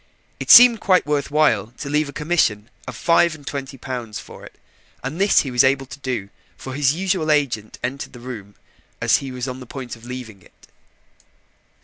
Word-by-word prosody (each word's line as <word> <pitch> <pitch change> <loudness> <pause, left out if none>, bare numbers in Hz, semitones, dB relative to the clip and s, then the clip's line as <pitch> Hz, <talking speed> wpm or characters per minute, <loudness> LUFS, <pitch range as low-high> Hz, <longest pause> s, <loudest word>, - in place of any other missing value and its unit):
It - - -6
seemed 240 -2 +9
quite 185 -2 +3
worth 150 -1 -1
while 150 -6 +2
to - - -6
leave 150 +1 0
a - - -6
commission 140 -9 0 0.2
of - - -6
five 170 -1 +3
and 145 -2 -16
twenty 135 -1 -6
pounds 120 -4 -6
for - - -13
it, - - -14 0.4
and 150 +8 -4
this 200 - +5
he 135 - -5
was 125 -1 +4
able 135 0 +2
to 130 - -11
do, 125 -8 -4 0.3
for 130 - -8
his 140 +1 +1
usual 185 -3 -1
agent 125 -8 0
entered 135 +4 -4
the 125 - -11
room 110 -5 -9 0.4
as - - +3
he 135 -1 -7
was 125 0 -5
on 130 0 -6
the 125 - -11
point 130 -2 -7
of 115 - -18
leaving 120 -5 -8
it. - - -22
135 Hz, 200 wpm, -21 LUFS, 125-150 Hz, 0.4 s, seemed